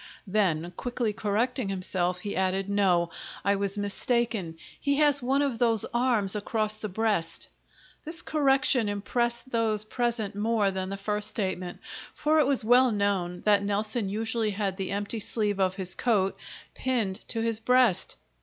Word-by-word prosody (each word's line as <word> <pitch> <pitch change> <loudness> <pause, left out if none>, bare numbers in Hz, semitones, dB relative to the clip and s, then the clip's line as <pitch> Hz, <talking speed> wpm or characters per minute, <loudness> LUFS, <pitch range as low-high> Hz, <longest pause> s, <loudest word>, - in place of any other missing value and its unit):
Then, 180 -5 0
quickly 245 -3 -2
correcting 220 +3 -1
himself, 180 -1 -1
he 205 - -4
added: 190 +1 0
"No, 185 -4 +2 0.3
I 200 0 +3
was 200 +1 -1
mistaken, 205 -3 0 0.2
he 280 -1 +1
has 290 -1 +3
one 270 +3 +2
of 260 -5 -2
his 230 -3 +3
arms 235 -5 +1
across 215 +1 -1
his 215 - -3
breast." 205 -4 -1 0.5
This 330 +2 -4
correction 270 -6 +2
impressed 235 +5 -1
those 220 -2 +1
present 235 -3 -1
more 210 -1 +1
than 190 0 -4
the 195 - -4
first 210 +1 +2
statement, 185 -4 -3 0.3
for 310 +1 +2
it 290 - +3
was 270 -5 +2
well 250 +2 +5
known 195 -4 -1
that 205 -1 +3
Nelson 210 +1 -1
usually 225 +1 -1
had 200 -2 -2
the 190 -2 -3
empty 205 +3 -3
sleeve 210 -1 0
of 185 -1 +1
his 185 -2 -4
coat 200 -6 +1 0.4
pinned 230 -7 -1
to 225 - -1
his 225 -1 0
breast. 250 -4 +3
210 Hz, 155 wpm, -27 LUFS, 195-240 Hz, 0.5 s, well